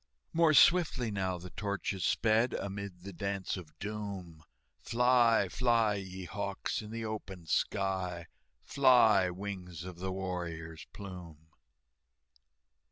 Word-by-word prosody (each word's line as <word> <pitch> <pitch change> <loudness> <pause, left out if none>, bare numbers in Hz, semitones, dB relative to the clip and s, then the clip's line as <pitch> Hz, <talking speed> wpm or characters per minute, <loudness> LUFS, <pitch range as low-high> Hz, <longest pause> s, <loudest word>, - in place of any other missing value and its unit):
More 160 -2 +4
swiftly 150 -9 +5
now 95 -2 -1
the 90 +1 -10
torches 100 -2 -3
sped, 115 +2 +2
Amid 100 -2 -5
the 100 0 -8
Dance 100 +2 -2
of 90 -5 -10
Doom, 100 -6 -6 0.4
"Fly, 120 -3 +3
fly, 115 0 +2
ye 95 -2 -6
hawks, 100 +3 -3
in 105 - -9
the 115 0 -4
open 100 -5 -6
sky, 95 -1 -1 0.4
Fly, 115 -9 +5
wings 90 -3 -6
of 90 -1 -9
the 95 +1 -3
warrior's 85 -4 -5
plume!" 85 -6 -10
100 Hz, 115 wpm, -32 LUFS, 90-110 Hz, 0.4 s, swiftly